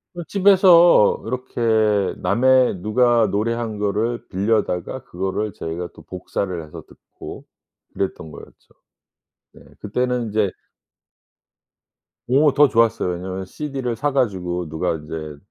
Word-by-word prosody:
그 175 - -5
집에서 185 - +5
이렇게 110 -4 0
남의 125 +4 +3
누가 120 +1 +3
노래한 110 +2 -2
거를 105 +4 -2
빌려다가 100 +2 -1
그거를 95 +3 -3
저희가 85 +2 -5
또 - - -15
복사를 90 -1 -5
해서 75 - -10
듣고 - - -12 0.5
그랬던 80 -5 -4
거였죠. - - -14 0.9
네. - - -17 0.2
그때는 125 +3 -1
인제 105 -2 0 1.8
오 140 +3 +3
더 145 +1 +5
좋았어요. 115 -5 +2
왜냐하면 95 +2 -6
CD를 135 +1 -4
사 145 +6 -1
가지고 90 - -1
누가 80 +3 -1
인제 75 -1 -7
110 Hz, 260 characters per minute, -21 LUFS, 95-125 Hz, 1.8 s, 집에서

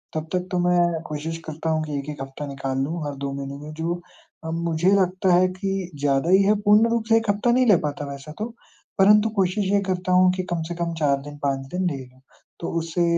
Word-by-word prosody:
तब 155 0 -3
तक 180 0 -1
तो 180 - 0
मैं 175 -2 +2
कोशिश 155 +2 -4
करता 160 +1 -4
हूँ 155 -1 +1
कि 150 -2 -3
1-1 145 0 -7
हफ़्ता 135 +2 -6
निकाल 135 -1 -4
लूँ 160 +2 -3
हर 145 - -5
2 140 - -2
महीने 140 0 -5
में, 150 - -8
जो 165 +2 -2 0.5
अ, 160 - -5
मुझे 170 +2 +1
लगता 185 0 +1
है 180 +1 +5
कि 190 0 -3
ज़्यादा 140 +2 +1
ही 190 +2 +6
है। 210 +2 +4
पूर्ण 210 +2 +5
रूप 230 -1 0
से 225 - +6
1 225 -2 -1
हफ़्ता 205 +4 +2
नहीं 255 +1 +4
ले 205 - +7
पाता 145 0 -4
वैसा 140 +2 -9
तो। 215 - -1 0.5
परंतु 210 +2 +6
कोशिश 195 +1 +1
ये 205 - +4
करता 185 0 -1
हूँ 180 0 +5
कि 185 0 -2
कम 170 -2 -1
से 175 - -5
कम 170 -1 -2
4 140 -2 +3
दिन, 145 +1 -10
5 135 -1 -1
दिन 185 +1 0
ले 145 - -4
लूँ। 130 +1 -22 0.4
तो 170 - -4
उससे 165 +1 -1
170 Hz, 235 wpm, -23 LUFS, 145-185 Hz, 0.5 s, ले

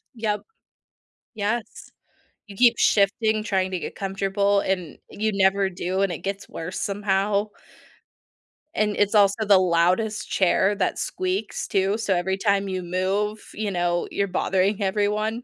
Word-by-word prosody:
Yep. 215 -2 -1 0.9
Yes. 215 +2 -3 0.6
You 200 - -11
keep 240 +2 +5
shifting, 215 +1 +2
trying 190 -3 0
to 185 - -2
get - - -6
comfortable, 200 +1 0
and 180 -6 -3
you 215 +1 -1
never 195 0 +2
do, 185 +1 -2
and 195 -2 +1
it 170 - -5
gets 195 0 -5
worse 165 +3 -6
somehow. 200 +1 0 1.3
And 210 -5 +1
it's 205 +1 +2
also 205 +1 +4
the 200 -1 +6
loudest 185 +5 +1
chair 190 +2 +2
that 190 -2 -1
squeaks, 185 +3 -3
too, 195 +1 +1
so 210 -4 0
every 190 +2 -1
time 200 0 +1
you 185 -1 -3
move, 195 +4 -1
you 210 -1 -3
know, 175 -1 0
you're 200 - 0
bothering 190 +2 0
everyone. 210 +4 0
200 Hz, 145 wpm, -24 LUFS, 190-210 Hz, 1.3 s, the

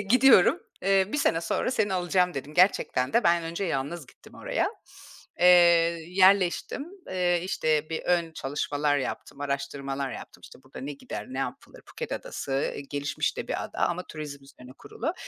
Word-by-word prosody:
gidiyorum. 235 -1 +5 0.2
Eee, 195 0 +4
bir 295 - 0
sene 165 - +2
sonra 165 +8 -1
seni 215 -6 0
alacağım." 180 0 +1
dedim. 140 +2 -6
Gerçekten 175 -8 +2
de 235 - +3
ben 170 0 +4
önce 165 +4 -4
yalnız 145 -1 -3
gittim - - -18
oraya. - - -1 0.7
Eee, 180 - +5 0.6
yerleştim, 190 - +3 0.2
eee, 180 -2 +1
işte, 155 -4 0
bir 160 - -3
ön 170 -2 +1
çalışmalar 145 0 -1
yaptım, 140 +1 -5
araştırmalar 140 -1 -3
yaptım. - - -10
İşte, - - -13
burada 130 - -11
ne 140 +2 -5
gider, 105 -6 -7
ne 130 - -6
yapılır? 135 - -6
Phuket - - -6
Adası, 135 0 -3
eee, - - -5
gelişmiş 145 0 -2
de - - -5
bir - - -2
ada - - -9
ama 175 +1 0
turizm 145 -3 -8
üzerine 125 -2 -14
kurulu. - - -4
165 Hz, 165 wpm, -27 LUFS, 140-185 Hz, 0.7 s, gidiyorum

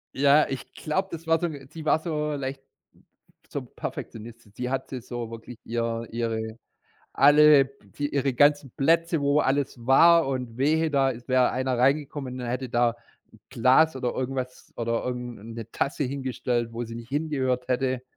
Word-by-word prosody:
Ja, 140 +2 +5
ich 135 - -6
glaube, 190 +5 -2
das 165 0 -8
war 165 0 +3
so 175 - 0
'n 140 -5 -8
sie 155 0 -9
war 155 - +3
so 150 -2 -2
leicht 135 -1 -4 0.9
so - - -4
Perfektionistin. 115 -1 -8
Sie 125 0 -3
hatte 130 -1 -4
so 120 -1 -6
wirklich 115 +1 -9
ihr 115 0 -2
ihre 110 -1 -3 0.6
alle 145 0 +6 0.2
die 145 +9 -5
ihre 140 -1 +1
ganzen 145 0 +3
Plätze, 165 +2 +2
wo 140 +1 +3
alles 135 -3 -1
war 165 +4 +6
und 125 -4 -4
wehe, 155 +3 +2
da 135 -2 +2
ist 125 +1 -9
wäre 130 -1 +4
einer 130 0 -1
reingekommen 135 0 0
und 125 - -4
hätte 125 +1 -3
da 120 0 +1 0.4
'n - - -18
Glas 130 +5 +4
oder 125 -2 -2
irgendwas 130 -1 -4
oder 115 0 -1
irgend 125 -1 -4
'ne 100 - -14
'ne 115 -2 -8
Tasse 145 +1 -1
hingestellt, 125 -3 -2
wo 120 +1 -4
sie 115 - -8
nicht 115 0 -9
hingehört 130 -4 -1
hätte. 130 0 0
130 Hz, 170 wpm, -26 LUFS, 120-145 Hz, 0.9 s, alle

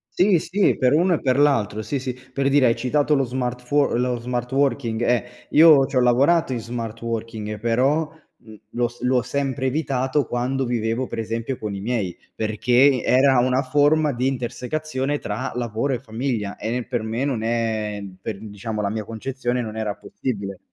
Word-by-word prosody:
Sì, 185 0 +4
sì, 190 +5 +1
per 130 -1 +3
uno 175 +3 +3
e - - -5
per 130 0 +2
l'altro, 110 -8 +2
sì, 140 +6 -3
sì. 130 -1 -3
Per 135 +2 -3
dire 140 -2 +4
hai 115 - +3
citato 145 +3 +1
lo 135 - +2
smart 125 -1 -3
fuor 140 -1 +1
lo 125 -1 0
smart 125 +1 -3
working, 130 -4 0
eh, 120 0 +2 0.3
io 150 -4 +7
ci - - -7
ho 125 - +4
lavorato 135 +5 +3
in 120 - -2
smart 115 -1 -6
working, 110 -2 -4
però, 130 +8 +2 0.3
mhmm, 110 -1 -14 0.2
l'ho 120 0 +1
s 120 0 -15
l'ho 125 -1 +2
sempre 135 0 -2
evitato 135 -1 0
quando 130 +2 -1
vivevo 120 +1 -1
per - - -6
esempio 115 +3 -3
con 105 -2 -4
i 100 - -5
miei, 105 -5 -2 0.2
perché 120 +5 +3
era 130 0 +4
una 130 +2 +2
forma 145 +2 +3
di 125 +2 0
intersecazione 135 +2 -2
tra 105 -6 -4
lavoro 120 +3 -1
e 125 - -2
famiglia 115 -3 -3
e 115 +3 -3
per 125 -2 -2
me 110 +4 -2
non 130 -6 -1
è 110 -2 -1 0.2
per, 105 -1 -4
diciamo, 105 +1 -5
la 100 - 0
mia 110 0 -3
concezione, 125 +2 -3
non 110 -1 -6
era 110 -2 -2
possibile. 100 -6 -5
125 Hz, 185 wpm, -22 LUFS, 115-135 Hz, 0.3 s, io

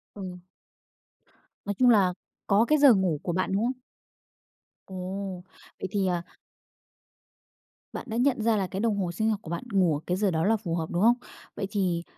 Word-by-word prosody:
Ừm. 185 -3 -7 1.2
Nói 205 - -1
chung 250 -1 +6
là 195 -5 +4 0.3
có 205 +4 +4
cái 305 - +3
giờ 280 -4 +7
ngủ 185 -6 +1
của 175 - -2
bạn, 185 +2 -1
đúng 205 +4 +1
không? 255 0 -3 1.1
Ồ! 190 0 -5 0.4
Vậy 190 - -3
thì 195 -2 +1
à 175 -1 -1 1.7
Bạn - - -6
đã 225 - -2
nhận 255 -2 +2
ra 225 -1 +2
là 190 -2 0
cái 190 - -5
đồng 220 -2 +1
hồ 185 -3 -1
sinh 220 +6 0
học 215 - 0
của - - -9
bạn 170 - -3
ngủ 180 -6 +3
ở - - -7
cái 180 +1 0
giờ 200 -2 +1
đó 160 +1 0
là 220 +1 +3
phù 175 -6 -3
hợp, 160 -2 -3
đúng 175 +2 0
không? 235 +2 +6 0.4
Vậy 195 - -3
thì 180 -5 0
195 Hz, 195 wpm, -27 LUFS, 180-220 Hz, 1.7 s, giờ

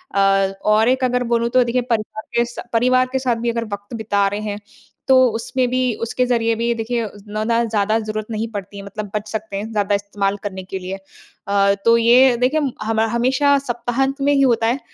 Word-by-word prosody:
अ, 195 0 +3
और 215 +2 +4
एक 260 0 +1
अगर 250 0 +1
बोलूँ, 235 0 +2
तो 255 +1 +4
देखिए 245 +1 0
परिवार 220 -2 -3
के 235 - +3
स 240 - -11 0.2
परिवार 255 +2 +3
के 265 - 0
साथ 255 -2 0
भी 235 - +1
अगर 230 0 -3
वक़्त 205 +3 -8
बिता 205 -2 +1
रहे 205 +1 -3
हैं, 210 -1 -4 0.5
तो 260 -1 +6
उसमें 250 +2 -1
भी 255 +1 0 0.2
उसके 235 +2 0
ज़रिए 230 -2 +1
भी 235 +1 0
देखिए 230 +1 -2
उतना 210 +1 -6
दा 230 +1 +2
ज़्यादा 220 -1 +1
ज़रूरत 215 0 -4
नहीं 220 +1 -2
पड़ती 200 -1 -7
है, 200 - -7
मतलब 200 0 -7
बच 210 0 -3
सकते 220 -2 -4
हैं, 215 +3 -5
ज़्यादा 205 -1 +1
इस्तेमाल 200 0 -2
करने 190 -2 -5
के 190 +1 -6
लिए। 185 +1 -5 0.5
अ, 200 0 +3
तो 230 0 +6
ये 240 +2 +5
देखिए 255 +6 +1
हम 285 -4 -1
हमा 220 0 +1
हमेशा 260 +5 +2
सप्ताहांत 265 +2 -2
में 285 +1 +3
ही 275 - +3
होता 230 -4 +3
है। 245 +4 0
230 Hz, 215 wpm, -20 LUFS, 205-250 Hz, 0.5 s, तो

